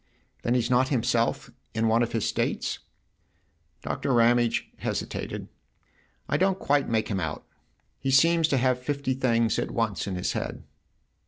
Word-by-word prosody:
" - - -40
Then 120 - +1
he's 125 0 0
not 125 +1 +4
himself 115 -3 0 0.2
in 115 0 +2
one 115 +1 +3
of 120 - 0
his 115 -3 0
states? - - -1 0.5
" 80 0 -43
Doctor 140 - -2
Ramage 120 -1 +3
hesitated. - - -4 0.4
" - - -38
I 145 - +1
don't 190 +3 +2
quite 145 -5 +1
make 110 -1 0
him 100 -3 -1
out. 80 -3 -4 0.5
He 135 - -2
seems 165 +4 +5
to 140 - +1
have 130 0 +2
fifty 140 0 -2
things 115 -3 +1
at - - -2
once 115 -5 -1
in 95 - -3
his 90 - -1
head." - - -4
120 Hz, 170 wpm, -26 LUFS, 115-135 Hz, 0.5 s, seems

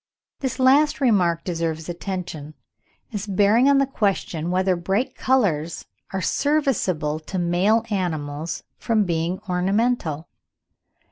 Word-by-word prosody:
This 265 -3 -3
last 280 +3 +4
remark 180 - +2
deserves 165 -2 -3
attention, 170 -4 -5 0.6
as 205 0 -4
bearing 205 +7 +4
on 280 - +5
the 275 - +4
question 195 - -1
whether 185 +1 +2
bright 195 +8 -1
colours 175 - 0 0.3
are 190 -1 -3
serviceable 195 - 0
to 175 +4 -6
male 185 +6 +2
animals 160 -4 -3 0.2
from 220 -2 +2
being 170 0 -1
ornamental. 185 -3 0
185 Hz, 115 wpm, -23 LUFS, 165-230 Hz, 0.6 s, on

